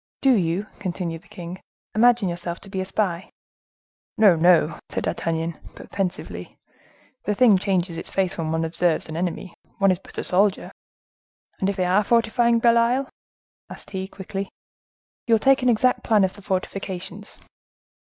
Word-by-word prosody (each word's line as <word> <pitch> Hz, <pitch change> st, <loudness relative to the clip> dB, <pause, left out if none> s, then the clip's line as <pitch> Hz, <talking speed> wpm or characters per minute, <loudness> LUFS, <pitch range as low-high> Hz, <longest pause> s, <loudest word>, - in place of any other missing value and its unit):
"Do 270 Hz, -1 st, +5 dB
you," 180 Hz, 0 st, 0 dB
continued 175 Hz, -4 st, -4 dB
the -, -, -23 dB
king, 175 Hz, +1 st, -8 dB, 0.3 s
"imagine 235 Hz, -1 st, +4 dB
yourself 175 Hz, 0 st, -4 dB
to 195 Hz, -, -13 dB
be 190 Hz, -2 st, -2 dB
a -, -, -3 dB
spy?" 190 Hz, -1 st, -2 dB, 0.9 s
"No, 210 Hz, -5 st, +6 dB
no," 165 Hz, -1 st, +3 dB
said -, -, -3 dB
D'Artagnan, 165 Hz, 0 st, -2 dB, 0.2 s
but -, -, -12 dB
pensively; 190 Hz, -2 st, -4 dB, 0.7 s
"the 210 Hz, -, 0 dB
thing 215 Hz, -5 st, +5 dB
changes 180 Hz, -4 st, -1 dB
its -, -, -4 dB
face 190 Hz, -2 st, 0 dB
when 160 Hz, -2 st, -3 dB
one 160 Hz, 0 st, 0 dB
observes 165 Hz, 0 st, 0 dB
an 160 Hz, -, -7 dB
enemy: 175 Hz, +1 st, -3 dB, 0.2 s
one 195 Hz, -1 st, +4 dB
is 180 Hz, -, -1 dB
but -, -, -16 dB
a -, -, -2 dB
soldier. 195 Hz, +2 st, +1 dB, 0.9 s
And 190 Hz, -, +1 dB
if 200 Hz, -, -2 dB
they 185 Hz, -2 st, 0 dB
are 190 Hz, +4 st, +3 dB
fortifying 235 Hz, +1 st, +3 dB
Belle 235 Hz, 0 st, +4 dB
Isle?" 250 Hz, +4 st, +1 dB, 0.6 s
added -, -, -11 dB
he, 190 Hz, -1 st, -4 dB
quickly. 195 Hz, 0 st, -6 dB, 0.8 s
"You 230 Hz, -, +5 dB
will -, -, +1 dB
take 270 Hz, +3 st, +4 dB
an 250 Hz, -, +3 dB
exact 250 Hz, +2 st, +2 dB
plan 215 Hz, -3 st, +3 dB
of 190 Hz, -, +1 dB
the 205 Hz, -, -13 dB
fortifications." 190 Hz, -1 st, -4 dB
190 Hz, 170 wpm, -23 LUFS, 175-215 Hz, 0.9 s, No